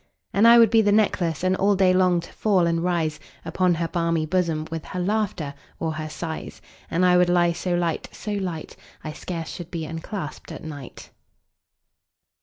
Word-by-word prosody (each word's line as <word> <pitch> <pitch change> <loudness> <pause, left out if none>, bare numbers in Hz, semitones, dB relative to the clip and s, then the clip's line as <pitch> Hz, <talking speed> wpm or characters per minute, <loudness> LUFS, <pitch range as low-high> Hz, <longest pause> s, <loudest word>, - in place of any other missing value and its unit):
And 210 +4 +5
I 235 +1 +9
would 230 -2 +6
be 225 -1 +6
the 205 -1 +2
necklace, 185 -6 +1
And 185 0 +2
all 200 +1 +3
day 185 -1 +4
long 180 -2 +3
to 170 - -13
fall 195 -5 +2
and 165 0 0
rise 165 -4 0 0.3
Upon 175 +1 +1
her 165 0 -1
balmy 165 -2 0
bosom, 165 -2 0
15 155 - -7
With 165 -1 -5
her 185 - -5
laughter 185 -6 -1 0.3
or 160 -1 -1
her 155 0 -5
sighs: 160 +1 -6 0.3
And 180 +3 +2
I 180 0 +5
would 180 0 +4
lie 175 -1 +3
so 175 +1 -2
light, 170 -2 -1
so 210 - -6
light, 180 -6 -4 0.3
I 155 - -5
scarce 165 0 -5
should 175 -1 -7
be 165 -3 -4
unclasp'd 165 +1 -6
at - - -8
night. 145 -4 -9
175 Hz, 195 wpm, -24 LUFS, 160-185 Hz, 0.3 s, I